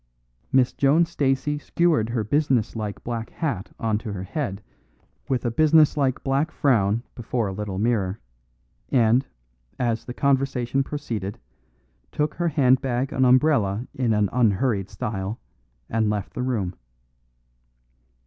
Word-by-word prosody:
Miss 130 -2 +3
Joan 145 +5 +4
Stacey 145 -2 0
skewered 155 -8 +1
her 115 -2 -1
business 130 -2 +1
like 105 -2 -5
black 115 -1 -4
hat 135 - -3
on 110 -2 0
to 110 -1 -6
her 95 -2 -5
head 105 - -4 0.7
with 130 -2 0
a 120 - +1
business 155 +3 +5
like 135 -3 0
black 140 +4 +1
frown 115 -7 +2
before 120 0 -2
a - - -3
little 100 -1 -4
mirror, 105 -3 0 0.7
and, 120 +1 +3 0.5
as 115 -3 -1
the 125 - -6
conversation 135 -2 +1
proceeded, 115 -9 -4 0.7
took 150 +1 -1
her 175 - -1
handbag 130 -3 +2
and 130 0 +3
umbrella 125 -5 +3
in 125 -3 0
an 105 -1 +2
unhurried 110 -3 +1
style, 105 0 -4 0.5
and 110 -1 0
left 105 -2 -3
the - - -4
room. 110 -8 -1
125 Hz, 135 wpm, -24 LUFS, 105-135 Hz, 0.7 s, business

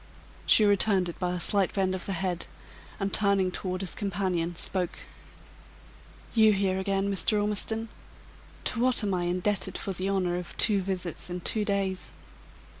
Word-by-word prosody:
She 215 - +7
returned 200 -2 +3
it 170 - -9
by 180 -1 -1
a - - -3
slight 195 +1 +2
bend 190 -2 +1
of 185 -2 -4
the 195 - -2
head, 180 -1 -3 0.5
and 195 0 -2
turning 200 -3 +2
toward 185 0 -3
his 190 - -4
companion, 180 -4 -2
spoke: 180 +1 -2 1.4
"You 220 -2 +6
here, 190 -1 0
again, 195 +1 0
Mr. 195 +3 +2
Ormiston! 210 +2 +1 0.8
To 230 - -1
what 250 -2 +4
am 200 -2 0
I 175 -1 0
indebted 185 +2 0
for 195 - -4
the 185 +2 -2
honor 185 -3 0
of 180 - -9
two 205 -2 +4
visits 180 -2 -4
in 180 0 -4
two 215 +4 0
days?" 195 -2 -2
190 Hz, 165 wpm, -28 LUFS, 180-200 Hz, 1.4 s, She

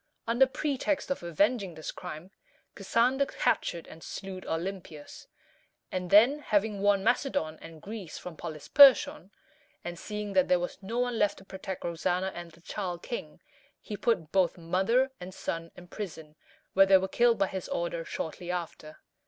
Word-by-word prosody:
Under 240 +3 +4
pretext 285 +1 -1
of 275 - -1
avenging 195 +2 0
this 155 - -5
crime, 155 +5 -8 0.4
Cassander 260 +4 +2
captured 170 - 0
and 160 - -13
slew 190 -1 -6
Olympias; 165 -3 -5 0.6
and 180 -1 -3
then, 235 +10 +6
having 210 -6 0
won 200 -1 +3
Macedon 220 - 0
and 165 -1 -12
Greece 205 -6 -7
from 180 -2 -8
Polysperchon, 255 - +5 0.5
and 175 -1 -6
seeing 210 -1 -5
that 185 -1 +4
there 180 - +4
was 175 +3 -5
no 220 +5 -4
one 245 -2 0
left 205 -1 +2
to 195 - -14
protect 190 0 -6
Roxana 180 +2 -1
and 175 -1 -7
the 165 - -20
child 180 -1 -5
king, 160 -11 -6 0.4
he 210 - -7
put 190 -8 0
both 185 -3 +2
mother 190 +10 +1
and 180 +1 -8
son 165 0 -4
in 180 - -12
prison, 160 -6 -7 0.4
where 195 0 +6
they 190 0 +8
were 190 0 -1
killed 235 +2 +3
by 195 - +3
his 190 -2 -5
order 170 -1 -2
shortly 170 +2 -5
after. 170 -3 -5
190 Hz, 160 wpm, -29 LUFS, 170-220 Hz, 0.6 s, they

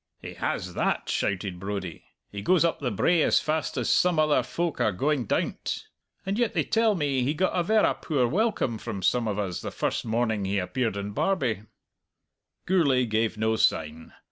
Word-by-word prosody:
"He - - -8
has - - -3
that!" - - -1
shouted 95 -2 -1
Brodie. 95 -3 -5 0.3
"He 100 - -6
goes 175 - +3
up 170 - 0
the 135 - -1
brae 155 - +2
as - - +4
fast 155 -2 -2
as 125 - -1
some 180 -2 +3
other 155 -1 +3
folk 170 -2 -3
are 110 - +3
going 135 +6 0
down't. - - -2 0.4
And 195 +4 -1
yet 240 -2 0
they - - +2
tell 225 -2 +2
me 140 -6 0
he 140 +5 0
got 185 +4 +1
a 180 - +1
verra 215 +5 +3
poor 145 -6 0
welcome 175 - 0
from 95 -2 -5
some 115 +5 +2
of 105 -2 -2
us 95 -4 -3
the - - -4
first - - -2
morning 110 -2 0
he 100 +1 -1
appeared 110 +3 -1
in 100 +1 -4
Barbie!" 120 - 0 1.0
Gourlay 140 -9 +3
gave 110 0 0
no 110 +1 +1
sign. 80 -3 0
125 Hz, 190 wpm, -26 LUFS, 105-165 Hz, 1.0 s, as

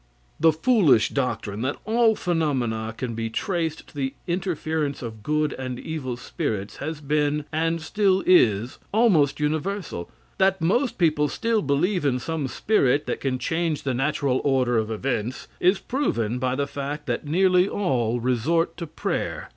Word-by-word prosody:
The 160 +1 +6
foolish 160 - +4
doctrine 115 -6 -2
that 130 +3 -1
all 225 0 +3
phenomena 130 - -1
can 125 -2 -3
be 115 0 -3
traced 165 - -2
to - - -20
the 135 -1 -2
interference 160 -5 -2
of 110 -2 -7
good 150 +4 0
and 130 -1 -5
evil 135 -6 -4
spirits, 105 -4 -4
has 155 +2 -4
been, 150 0 0
and 165 +1 0
still 190 +3 +1
is, 120 - +4
almost 195 - +3
universal. 155 - -2 0.3
That 190 0 +3
most 225 - +1
people 155 -4 +3
still 230 +4 0
believe 170 +6 +1
in 135 -3 +2
some 150 +2 -3
spirit 145 - +2
that - - -3
can 130 -2 0
change 160 +3 -1
the 135 - -1
natural 135 0 0
order 130 -4 +2
of 110 0 -2
events, 120 +1 -3
is 185 +3 +4
proven 125 - -1
by 130 0 0
the 140 +1 0
fact 145 +1 -5
that 125 +2 -3
nearly 180 +3 +3
all 120 - 0
resort 130 +8 +1
to 170 - -5
prayer. - - -3
150 Hz, 155 wpm, -24 LUFS, 125-175 Hz, 0.3 s, The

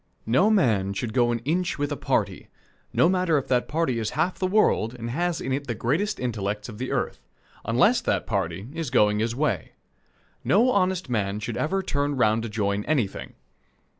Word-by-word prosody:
No 155 - +3
man 110 - +2
should 110 +3 -4
go 120 -1 +3
an 120 -1 -3
inch 175 +5 0
with 145 0 -2
a - - 0
party - - -1 0.4
no - - +4
matter 180 -3 +2
if 135 - -2
that 125 -2 +2
party 150 -7 0
is 110 - -1
half 170 +4 0
the 185 - +1
world 185 - +2
and 115 -1 -5
has 175 +4 -1
in 130 - -2
it 140 +1 -3
the 120 - -2
greatest 170 - -1
intellects 105 -4 -3
of 110 -3 -9
the 130 - -3
earth - - -2 0.5
unless - - +3
that - - 0
party 85 +6 -2
is 165 -4 -3
going 105 -2 +3
his 115 +1 -1
way. 130 - -1 0.7
No 235 +6 +4
honest 185 - +1
man 105 -4 -1
should 110 +2 -4
ever 190 +5 -1
turn 145 -4 -1
round 110 -2 +3
to 115 - -5
join 105 -1 -1
anything. 135 -10 -2
125 Hz, 195 wpm, -25 LUFS, 110-165 Hz, 0.7 s, no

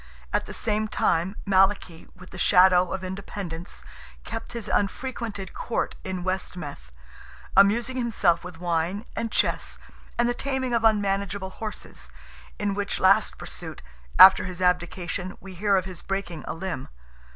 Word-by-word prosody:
At - - 0
the - - -7
same 215 -1 0
time 175 -1 +1
Malachy, 190 -3 +2
with 180 0 -14
the - - -9
shadow, 180 -1 +5
of 190 -1 -3
independence, 185 -2 -6 0.4
kept 225 +1 -6
his 235 -2 -5
unfrequented 210 -2 -2
court 235 - -2
in 185 -1 -4
West 185 0 -2
Meath, 145 - -8 0.6
amusing 230 +6 +4
himself 200 -8 +2
with 180 -2 -9
wine 175 +4 -1
and 230 -1 -2
chess - - 0 0.4
and 240 - +3
the 240 - +1
taming 260 -1 -2
of 230 -1 +2
unmanageable 200 -3 +1
horses, 190 - -7 0.5
in 205 -1 -1
which 200 0 -1
last 190 +1 +4
pursuit, - - -7 0.3
after 190 -1 +9
his 180 -1 -6
abdication, 180 +1 -1
we 195 -1 -10
hear 200 +2 +2
of 185 -1 +1
his 185 -2 -7
breaking 190 -5 -4
a - - -3
limb. 170 -6 -4
190 Hz, 150 wpm, -26 LUFS, 180-210 Hz, 0.6 s, after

